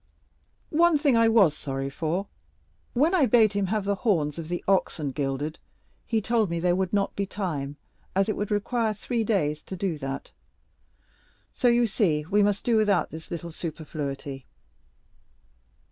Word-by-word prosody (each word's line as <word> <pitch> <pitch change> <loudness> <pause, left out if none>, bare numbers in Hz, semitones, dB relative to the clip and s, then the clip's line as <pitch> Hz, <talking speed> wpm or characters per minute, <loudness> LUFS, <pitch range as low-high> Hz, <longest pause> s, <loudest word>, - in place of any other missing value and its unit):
One 335 0 +4
thing 285 -4 +3
I 230 0 +5
was 200 -9 +5
sorry 135 -2 -4
for; 165 +6 -2 0.7
when 300 +8 +3
I 315 -8 +4
bade 220 -2 +5
him 200 -1 0
have 210 +1 -1
the 200 - +1
horns 165 - +1
of 160 - -6
the 175 0 -3
oxen 165 -6 +1
gilded, 140 +2 -3 0.5
he 225 -2 +1
told 225 -3 +1
me 170 0 -2
there 175 +1 +2
would 190 -1 -1
not 200 -1 0
be 200 -1 -2
time, 150 -9 -4 0.4
as 195 0 +3
it 215 - 0
would 205 - -3
require 215 +1 0
three 230 +3 -2
days 155 -9 0
to 190 - -7
do 175 -4 -2
that; 135 0 -5 1.2
so 250 - +1
you 240 0 +4
see 175 -9 +1
we 205 +1 +4
must 205 0 +1
do 235 -2 +3
without 205 -3 +2
this 160 +1 -9
little 170 0 -5
superfluity." 145 -4 -5
195 Hz, 165 wpm, -26 LUFS, 155-220 Hz, 1.2 s, I